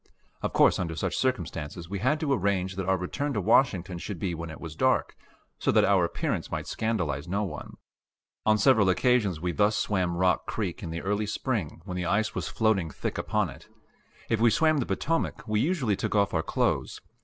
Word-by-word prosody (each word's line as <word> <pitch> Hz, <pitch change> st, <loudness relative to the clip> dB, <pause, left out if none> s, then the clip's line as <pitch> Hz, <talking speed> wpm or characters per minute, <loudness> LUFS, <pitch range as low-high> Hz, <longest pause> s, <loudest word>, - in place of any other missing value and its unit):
Of -, -, -1 dB
course -, -, +4 dB
under 85 Hz, -3 st, -2 dB
such 80 Hz, -, -2 dB
circumstances 85 Hz, -, -2 dB
we 100 Hz, +2 st, -4 dB
had 130 Hz, +8 st, +1 dB
to 145 Hz, -3 st, +1 dB
arrange 95 Hz, -4 st, 0 dB
that 95 Hz, -1 st, -3 dB
our 95 Hz, 0 st, +3 dB
return 140 Hz, +11 st, -3 dB
to 105 Hz, -, 0 dB
Washington 90 Hz, -4 st, +2 dB
should 100 Hz, +1 st, -5 dB
be 90 Hz, 0 st, -2 dB
when 85 Hz, 0 st, -5 dB
it 80 Hz, -, -9 dB
was 80 Hz, -2 st, -8 dB
dark, -, -, +1 dB, 0.4 s
so -, -, +2 dB
that -, -, +4 dB
our 95 Hz, -2 st, +4 dB
appearance 85 Hz, -, -2 dB
might -, -, -3 dB
scandalize 85 Hz, -10 st, -2 dB
no 100 Hz, +4 st, 0 dB
one. 85 Hz, -8 st, -7 dB, 0.7 s
On 110 Hz, 0 st, +4 dB
several 110 Hz, -3 st, +4 dB
occasions 105 Hz, -4 st, +2 dB
we 90 Hz, +1 st, -1 dB
thus 105 Hz, +4 st, +2 dB
swam 90 Hz, -4 st, 0 dB
Rock 90 Hz, 0 st, +2 dB
Creek -, -, -3 dB
in -, -, -5 dB
the 85 Hz, +1 st, -5 dB
early 105 Hz, +2 st, 0 dB
spring 105 Hz, -, -3 dB
when 90 Hz, -2 st, -5 dB
the 90 Hz, -1 st, -2 dB
ice 110 Hz, +3 st, +1 dB
was -, -, -3 dB
floating 110 Hz, -7 st, +1 dB
thick -, -, -4 dB
upon -, -, 0 dB
it. -, -, -14 dB, 0.6 s
If 115 Hz, -, +1 dB
we 120 Hz, -, +6 dB
swam 155 Hz, +7 st, +3 dB
the 125 Hz, -, -1 dB
Potomac, 155 Hz, -, -1 dB
we 105 Hz, 0 st, +1 dB
usually 135 Hz, -, +1 dB
took -, -, -2 dB
off 100 Hz, -1 st, +2 dB
our 80 Hz, -, +2 dB
clothes. -, -, -1 dB
100 Hz, 205 wpm, -27 LUFS, 85-110 Hz, 0.7 s, we